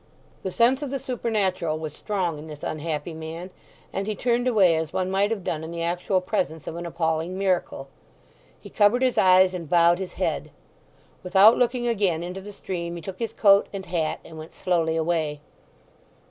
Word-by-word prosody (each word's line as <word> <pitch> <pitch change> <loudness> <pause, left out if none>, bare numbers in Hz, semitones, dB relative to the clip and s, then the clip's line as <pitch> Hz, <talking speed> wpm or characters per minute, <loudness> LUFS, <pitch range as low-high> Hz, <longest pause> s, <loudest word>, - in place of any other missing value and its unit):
The 190 - -4
sense 245 +7 +3
of 290 - -3
the 275 - -2
supernatural 200 -11 -1
was 155 -2 -6
strong 180 -7 -2
in 155 - -9
this 150 -2 -10
unhappy 155 +1 -3
man, 160 +3 -7 0.4
and 195 +1 -3
he 215 - -1
turned 245 +3 0
away 195 -8 +4
as 160 -1 -2
one 185 0 -1
might 195 +2 +2
have 220 -4 -3
done 160 -2 -3
in 160 - -6
the 170 0 -4
actual 180 +2 0
presence 160 -3 -2
of - - -5
an 170 0 -5
appalling 165 +1 -1
miracle. 185 -7 -1 0.7
He - - -13
covered 215 +5 +3
his 255 -1 +2
eyes 185 0 +5
and 170 -4 -6
bowed 170 0 +4
his 190 -2 -5
head. - - -2 0.7
Without 195 +4 +6
looking 245 0 +1
again 195 -8 +1
into 180 +2 -6
the 205 +2 -9
stream 170 -3 -5
he 170 - -7
took 185 +3 -7
his 230 -1 -2
coat 200 -1 +5
and 195 -1 -6
hat, 170 -3 -1
and 160 -1 -10
went 155 +1 -10
slowly 165 -3 0
away. 160 -2 -1
180 Hz, 190 wpm, -25 LUFS, 165-200 Hz, 0.7 s, Without